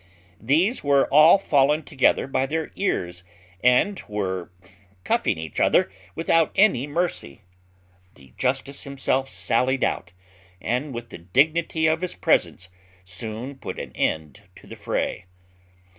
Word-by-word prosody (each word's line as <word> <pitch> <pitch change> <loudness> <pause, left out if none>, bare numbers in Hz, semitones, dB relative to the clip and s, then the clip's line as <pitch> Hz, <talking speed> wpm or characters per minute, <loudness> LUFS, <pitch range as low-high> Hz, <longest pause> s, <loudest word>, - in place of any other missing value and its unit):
These 165 - +1
were 140 -1 +4
all 155 +6 +7
fallen 150 -4 +2
together 135 - +2
by 135 0 -1
the 160 +2 -3
ears, 90 - -2 0.4
and 125 +11 +3
were 95 -4 -3 0.5
cuffing - - 0
each 80 -1 -6
other - - +3 0.2
without 165 0 +2
any 190 - +3
mercy. 150 - -3 0.7
The 65 -2 -19
justice 135 +2 -2
himself 135 -1 -2
sallied 130 +1 0
out, 85 - -2 0.5
and 125 +9 -2
with 120 -1 -7
the - - -10
dignity 155 - +1
of 160 0 +2
his 180 - -3
presence 90 0 0 0.4
soon 110 +9 -6
put - - -6
an - - -6
end 80 +6 -2
to - - -16
the - - -10
fray. - - -3
135 Hz, 130 wpm, -24 LUFS, 105-155 Hz, 0.7 s, all